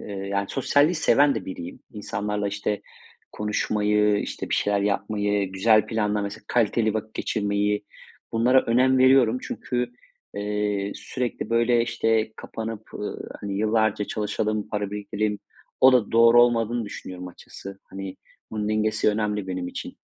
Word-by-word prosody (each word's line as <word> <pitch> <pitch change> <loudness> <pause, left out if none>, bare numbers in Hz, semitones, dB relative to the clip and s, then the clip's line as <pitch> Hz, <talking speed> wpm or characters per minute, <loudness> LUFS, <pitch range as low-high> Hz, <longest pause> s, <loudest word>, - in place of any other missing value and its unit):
eee, - - -9
yani, 100 0 -3
sosyalliği 145 +5 +2
seven 145 -2 +4
de - - -4
biriyim. 90 -2 -7
İnsanlarla, 105 0 -3
işte, 105 +1 -2 0.5
konuşmayı, 105 0 +1
işte, - - -5
bir - - +2
şeyler 100 -1 +1
yapmayı, 105 -1 0
güzel 110 +3 +4
planla 105 -2 0
mesela, 100 +2 -6
kaliteli 110 -2 +1
vakit 110 0 -4
geçirmeyi 105 0 0 0.5
bunlara 125 +3 +4
önem 130 +3 +3
veriyorum. 130 -2 +5
Çünkü, 125 -1 -3 0.4
eee, 105 -1 -1
sürekli 125 -3 -4
böyle, 115 0 +3
işte, 115 -2 0
kapanıp, 110 -1 -6
ııı, 105 - -5 0.2
hani, 100 -1 -4
yıllarca 110 -1 +1
çalışalım, 105 0 -2
para 105 -1 -2
biriktireyim, 105 0 -2 0.4
o 130 0 +8
da 120 -5 +2
doğru 115 +1 +7
olmadığını 120 -1 +1
düşünüyorum 90 -2 -7
açıkçası, 95 +2 -11
hani, 95 -1 -7 0.3
bunun 105 -1 -2
dengesi 110 0 +1
önemli 105 -2 -1
benim 90 -1 -3
için. - - -7
105 Hz, 135 wpm, -25 LUFS, 100-115 Hz, 0.5 s, o